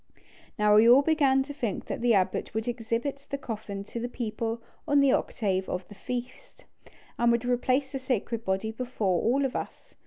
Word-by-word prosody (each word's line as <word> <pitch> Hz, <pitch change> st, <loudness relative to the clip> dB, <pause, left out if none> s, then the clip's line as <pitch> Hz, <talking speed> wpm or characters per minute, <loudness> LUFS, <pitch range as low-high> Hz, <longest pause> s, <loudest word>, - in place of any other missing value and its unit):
Now 210 Hz, 0 st, +5 dB
we 225 Hz, +2 st, +7 dB
all 260 Hz, +4 st, +8 dB
began 280 Hz, -4 st, +3 dB
to 285 Hz, +1 st, -8 dB
think 235 Hz, -7 st, -3 dB
that -, -, -4 dB
the 240 Hz, -2 st, +4 dB
abbot 190 Hz, +2 st, 0 dB
would 220 Hz, +1 st, -2 dB
exhibit 240 Hz, +4 st, -3 dB
the 280 Hz, -, -2 dB
coffin 210 Hz, -6 st, -6 dB
to 235 Hz, -, -6 dB
the 240 Hz, +1 st, -3 dB
people 230 Hz, -1 st, -3 dB, 0.3 s
on 290 Hz, -1 st, +4 dB
the 280 Hz, -1 st, +5 dB
octave 190 Hz, -7 st, 0 dB
of 180 Hz, 0 st, -4 dB
the -, -, -10 dB
feast, 250 Hz, +4 st, -7 dB, 0.5 s
and 235 Hz, 0 st, +4 dB
would 235 Hz, +1 st, +1 dB
replace 255 Hz, +2 st, +1 dB
the 270 Hz, -, -3 dB
sacred 235 Hz, -3 st, -2 dB
body 195 Hz, +3 st, -1 dB
before 220 Hz, -6 st, -1 dB
all 270 Hz, +5 st, +2 dB
of 265 Hz, -, -3 dB
us. -, -, -6 dB
235 Hz, 190 wpm, -28 LUFS, 215-265 Hz, 0.5 s, all